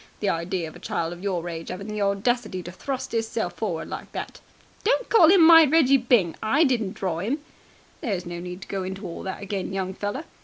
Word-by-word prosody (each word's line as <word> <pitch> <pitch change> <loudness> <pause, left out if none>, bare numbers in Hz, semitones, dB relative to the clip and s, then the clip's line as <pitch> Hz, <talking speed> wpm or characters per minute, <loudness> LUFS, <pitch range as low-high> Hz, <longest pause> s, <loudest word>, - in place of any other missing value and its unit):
The 205 - 0
idea 170 0 -2
of 155 - -11
a - - -11
child 165 +1 -2
of 175 - -11
your 180 -4 -2
age 165 -1 -6
'aving 185 +2 -6
the 210 -1 -4
audacity 200 0 0
to 175 - -7
thrust 260 +8 -5
'isself 225 -5 -1
forward 180 -7 -3
like - - -7
that!" - - -6 0.4
"Don't - - +1
call 355 -9 +7
him 360 -3 +7
my 330 0 +10
Reggie 285 -3 +5
Byng! 235 -9 +2
I 275 +9 +3
didn't 235 -9 0
draw 170 -4 -2
'im!" 235 +9 -1 0.6
"There's 200 - -2
no 175 0 -6
need 180 +2 -7
to - - -13
go 195 -1 -3
into 190 +2 -5
all 170 - -6
that 190 +1 -5
again, 195 -1 -3
young 190 -1 -2
feller. 205 - -4
200 Hz, 220 wpm, -25 LUFS, 180-245 Hz, 0.6 s, my